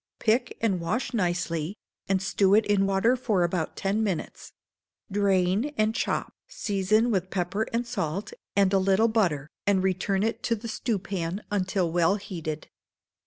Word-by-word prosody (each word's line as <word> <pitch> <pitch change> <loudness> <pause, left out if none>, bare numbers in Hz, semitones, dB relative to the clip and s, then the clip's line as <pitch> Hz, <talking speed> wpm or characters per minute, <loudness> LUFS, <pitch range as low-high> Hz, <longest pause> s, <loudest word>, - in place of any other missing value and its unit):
Pick 225 +3 +1
and 200 -5 +1
wash 215 +11 -2
nicely, 175 -3 -1 0.3
and 190 -1 +1
stew 195 +1 +3
it 220 - +4
in 200 -1 +2
water 195 +6 +3
for 215 -7 +1
about 175 -1 -1
ten 205 +3 0
minutes; 190 -6 -4 0.6
drain 200 +6 +1
and 215 0 +2
chop, 255 - -1
season 215 - +1
with 190 -3 0
pepper 190 +4 -1
and 235 +1 0
salt, 195 -5 -3 0.2
add 200 -1 +4
a 195 - +5
little 195 +4 +3
butter, 170 -10 0 0.2
and 195 -2 +3
return 190 +1 +1
it 225 +1 -1
to 230 - +1
the 230 +2 -7
stewpan 195 -5 -2
until 190 -3 0
well 175 +3 +3
heated. 165 -6 -5
195 Hz, 155 wpm, -27 LUFS, 185-220 Hz, 0.6 s, a